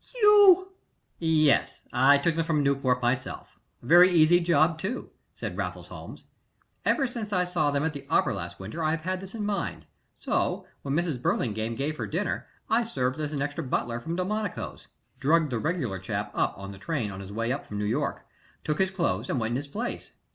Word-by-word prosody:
"You 405 -4 +7 0.2
" - - -45
"Yes 155 -3 +2
I 135 +4 +6
took 160 +3 +1
them 165 - +1
from 155 -3 +1
Newport 135 -3 +1
myself 125 +2 -2 0.2
very 175 +8 +7
easy 170 0 +6
job, 165 -1 +3
too," 205 +9 -4 0.2
said - - -5
Raffles - - -4
Holmes. - - -10 0.6
"Ever 275 - +2
since 235 -4 -5
I 180 -2 +2
saw 175 -4 +1
them 140 0 0
at 160 - -1
the 140 - -9
opera - - +3
last - - -6
winter 110 - -5
I 155 - +2
have 160 0 -1
had 185 +2 -2
this 195 +3 -8
in 210 -2 -3
mind, 200 -3 -3 0.3
so - - -1 0.2
when 140 0 -2
Mrs. 160 -7 -1
Burlingame 110 -2 -1
gave 150 +5 -2
her - - -3
dinner 185 +6 -2 0.2
I 225 +2 +3
served 130 - -2
as 150 -1 -2
an 140 -2 -1
extra 145 +3 -3
butler 120 -2 -1
from 165 +7 -4
Delmonico's 205 +2 -3 0.3
drugged 155 0 +3
the 120 - -1
regular 130 - -2
chap 105 +2 -3
up - - 0
on 100 +1 -7
the 100 - -11
train 120 -4 -2
on 95 - -7
his 100 0 -8
way 115 +3 -1
up 140 - -2
from 105 - -7
New 105 - -1
York 140 +7 -1 0.4
took 150 0 -1
his 190 0 +3
clothes, 135 - -1
and 135 - 0
went 110 0 -1
in 120 - 0
his 145 +2 -5
place. 225 +12 -5
155 Hz, 205 wpm, -27 LUFS, 125-180 Hz, 0.6 s, You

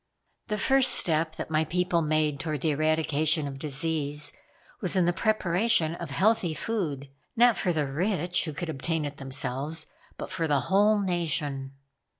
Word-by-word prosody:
"The 210 -2 -2
first 265 +3 +6
step 160 -1 +3
that - - -7
my 155 0 +2
people 180 +1 0
made 155 -2 0
toward 155 -3 -3
the 155 - +1
eradication 155 0 +1
of 135 -1 -7
disease 150 0 -1 0.5
was 185 0 +1
in 185 -2 +3
the 175 - +1
preparation 190 -3 +1
of 170 -2 -7
healthy 190 +1 +1
food; 150 -13 -4 0.2
not 240 -1 +5
for 180 - -1
the 155 -3 0
rich, 175 +5 -1
who 155 - -5
could 165 +3 -5
obtain 160 +1 -2
it 145 0 -6
themselves, 140 +3 -3 0.3
but - - -7
for 165 - -2
the 145 -3 +1
whole 205 - +3
nation." 150 -7 -2
160 Hz, 160 wpm, -27 LUFS, 145-180 Hz, 0.5 s, first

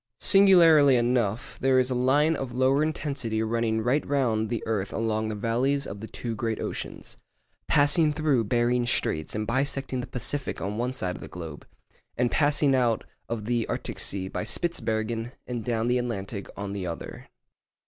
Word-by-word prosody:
Singularly 170 -8 +6
enough, 120 -3 0
there 130 0 +3
is 130 0 +2
a - - +2
line 140 +6 +3
of 135 -4 -5
lower 130 +3 +3
intensity 140 -8 -2
running 110 0 0
right 125 +6 +1
round 115 -6 +1
the 120 -1 -3
earth 105 -3 -2
along 110 -1 -1
the 110 - -3
valleys 125 +6 0
of 100 - -7
the 110 - -7
two 115 0 -5
great 110 0 -2
oceans, - - -6 0.5
'passing 150 +2 +4
through 145 -6 +1
Behring's 120 +2 +1
Straits 80 -7 0
and 110 0 -2
bisecting 135 +1 -1
the - - -7
Pacific, 135 +3 -3
on 100 +5 -3
one 125 +2 -1
side 90 -8 -2
of - - -12
the - - -8
globe, 80 -4 -9 0.5
and 125 -1 +1
passing 145 -1 +3
out 120 -4 +2 0.3
of 115 -2 -3
the 120 0 0
Arctic - - -4
Sea 95 -1 -1
by - - -4
Spitsbergen 115 -4 -2
and 120 -2 -4
down 115 -1 -1
the 125 +1 +2
Atlantic, 100 -4 -4
on 100 0 -4
the 95 -3 -4
other. 85 -1 -7
120 Hz, 175 wpm, -26 LUFS, 110-135 Hz, 0.5 s, Singularly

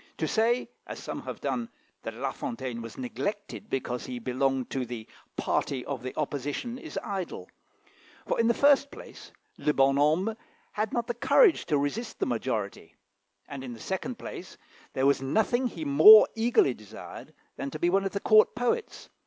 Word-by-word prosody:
To - - -1
say, 235 +3 +1 0.2
as - - -6
some - - -6
have - - -7
done, 235 -1 -2 0.3
that 115 - -6
La 135 +3 -2
Fontaine 120 -1 -5
was 115 -1 -9
neglected 140 - -5
because 125 -2 -3
he 125 -1 -5
belonged 130 +1 -1
to 135 - -1
the 120 -2 -7 0.3
"party 130 -3 -1
of 140 -4 -4
the 130 +1 -6
opposition," 150 - -3
is 320 - -8
idle; 185 - -5 0.7
for, - - -1
in 230 - +3
the 235 - +3
first 280 0 +4
place, - - -12 0.3
le 150 - +1
bonne 135 0 +4
homme 160 +10 +2 0.4
had 215 0 -2
not 235 -1 -1
the 240 - -2
courage 345 - +4
to 150 -3 +2
resist 205 +12 -3
the - - 0
majority, 110 -8 -3 0.5
and 140 -2 -7
in 125 -2 -6
the 115 - -11
second 220 - -4
place, 180 - -9 0.4
there 130 - 0
was 140 -1 +3
nothing 220 - +1
he 310 - -6
more 400 +10 +9
eagerly 225 - +3
desired 105 -3 -11 0.2
than 140 - -4
to 155 - -6
be 175 +3 +1
one 195 +1 +2
of 195 - -3
the 200 - -1
Court 215 +1 +5
poets. 245 - -2
150 Hz, 180 wpm, -28 LUFS, -, 0.7 s, more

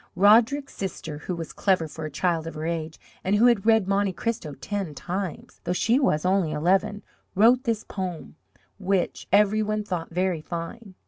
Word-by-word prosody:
Roderick's 230 +8 +4
sister, 165 -5 -5
who 180 +3 -4
was 165 -1 -6
clever 185 -5 +1
for 155 +1 -7
a - - -4
child 165 +2 -1
of 165 - -7
her 155 +1 -4
age, 160 -1 -3 0.2
and 195 +2 +2
who 220 +4 +5
had 235 -4 +3
read 220 -4 +4
Monte 200 -1 +1
Cristo 175 -8 -3
ten 185 +2 -4
times, 185 0 -5
though 175 - -1
she 230 +7 +2
was 170 - +1
only 185 -4 +2
eleven, 195 +7 +1 0.3
wrote 235 +6 +5
this 225 -2 0
poem, 185 -5 -6 0.4
which 190 -2 -1
every 210 +1 +4
one 215 0 -1
thought 180 -5 -4
very 180 -1 -1
fine. 180 +6 -7
190 Hz, 180 wpm, -25 LUFS, 165-210 Hz, 0.4 s, who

